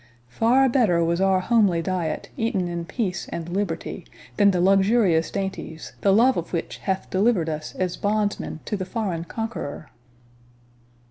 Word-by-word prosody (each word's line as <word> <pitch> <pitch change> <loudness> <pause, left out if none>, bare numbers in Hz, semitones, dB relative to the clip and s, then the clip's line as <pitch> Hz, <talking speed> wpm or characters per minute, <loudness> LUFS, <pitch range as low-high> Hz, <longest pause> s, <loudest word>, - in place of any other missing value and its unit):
Far 240 - +3
better 220 -10 +3
was 170 +2 0
our 190 -1 +3
homely 200 -6 +3
diet, 170 -4 -2
eaten 225 -6 -1
in 170 -1 -4
peace 195 -2 -3
and 170 -1 -5
liberty, 180 -2 -3 0.3
than 205 -1 +6
the 185 -2 +1
luxurious 195 -2 +3
dainties, 190 -5 -5
the 200 - +4
love 240 +6 +4
of 170 +1 -4
which 170 - -3
hath 190 0 -3
delivered 190 -4 +2
us 155 0 -5
as 185 -1 -2
bondsmen 205 -6 -1
to - - -2
the 190 - -3
foreign 185 -4 -3
conqueror!" 225 -8 -5
190 Hz, 150 wpm, -24 LUFS, 170-215 Hz, 0.3 s, than